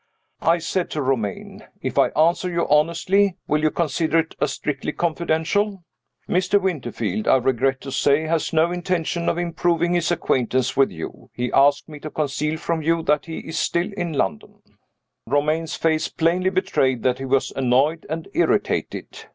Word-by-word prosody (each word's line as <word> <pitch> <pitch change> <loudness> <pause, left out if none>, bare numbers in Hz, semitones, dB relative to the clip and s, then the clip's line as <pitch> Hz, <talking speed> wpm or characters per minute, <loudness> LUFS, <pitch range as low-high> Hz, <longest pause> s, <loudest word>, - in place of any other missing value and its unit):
I 165 +2 +3
said 175 +2 -2
to 150 - -3
Romayne, 120 -7 -2 0.2
"If - - -2
I - - +5
answer 170 +3 +3
you 170 -1 -1
honestly, 175 +6 +2
will 150 0 +1
you 155 - +3
consider 160 +1 0
it 165 0 0
as 145 - +1
strictly 145 +1 -3
confidential? 175 +4 0 0.4
Mr. 185 +3 +2
Winterfield, 120 - -2
I - - +6
regret 130 +1 +1
to 135 - -7
say, 140 +3 +2
has 160 0 -1
no 165 +1 +2
intention 175 -1 -1
of - - -1
improving 175 0 0
his 175 -1 +1
acquaintance 130 -6 0
with 135 - +4
you. 80 -2 -8
He 125 0 -2
asked 140 +1 +4
me 150 -2 -10
to 155 - -6
conceal 150 +1 -2
from 165 0 -2
you 165 +1 +1
that 150 0 +1
he 165 - -5
is 160 0 -4
still 175 +4 0
in 175 -4 -3
London." 95 - -3 0.6
Romayne's 155 +5 0
face 160 -1 +1
plainly 175 +3 +1
betrayed 155 - 0
that 125 0 +1
he 135 - -4
was 135 0 +1
annoyed 135 +5 +1
and 160 +1 -4
irritated. 345 - -1
160 Hz, 165 wpm, -22 LUFS, 135-170 Hz, 0.6 s, I